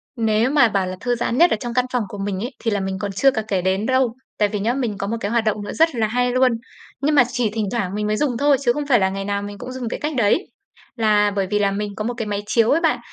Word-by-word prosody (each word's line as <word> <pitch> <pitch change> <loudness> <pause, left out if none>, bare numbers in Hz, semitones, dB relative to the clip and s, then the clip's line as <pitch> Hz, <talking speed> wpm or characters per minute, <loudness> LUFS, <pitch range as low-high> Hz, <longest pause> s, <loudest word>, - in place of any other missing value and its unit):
Nếu 225 +1 +1
mà 285 -5 +5
bảo 195 -3 0
là 185 - -4
thư 245 -1 0
giãn 240 0 -2
nhất 345 +4 +5
ở - - +2
trong 240 +1 -5
căn 250 +1 +2
phòng 245 -3 +1
của 205 - -8
mình 195 -1 -3
ấy, 240 +7 -4
thì 225 - -1
là 205 - 0
mình 190 0 -3
còn 200 +1 -3
chưa 270 +8 +3
cả 220 - -2
kể 195 -4 0
đến 190 +3 0
đâu. 260 -2 +1 0.2
Tại 210 - +3
vì 210 0 -3
nhá, 225 +4 0
mình 240 -6 -2
có 200 - -3
một 230 +3 -2
cái 200 -1 -3
hoạt 235 -1 +2
động 215 -1 -1
nữa 205 - -6
rất 325 -3 +2
là 225 -2 +1
hay 245 +2 0
luôn, 255 0 +3 0.5
nhưng 300 +2 +2
mà 265 - +7
chỉ 245 -3 0
thỉnh 215 0 -2
thoảng 205 -5 -2
mình 210 0 -1
mới 215 0 0
dùng 265 -4 0
thôi, 285 +1 +3
chứ 240 -3 +2
không 295 +1 -3
phải 245 -5 +4
là 190 -1 +2
ngày 195 +1 -4
nào 200 0 -1
mình 205 0 -7
cũng 250 +5 -7
dùng 255 -3 -4
cái - - -4
cách 300 +1 -2
đấy. 235 - +1 0.4
Là 210 -3 +3
bởi 195 -2 0
vì 210 - +2
là 200 -1 +2
mình 205 0 -4
có 215 - -4
một 240 +3 -2
cái 225 - -3
máy 205 -1 -2
chiếu 230 +1 +3
ấy 320 - +3
bạn. 310 -7 +2
225 Hz, 320 wpm, -21 LUFS, 205-250 Hz, 0.5 s, mà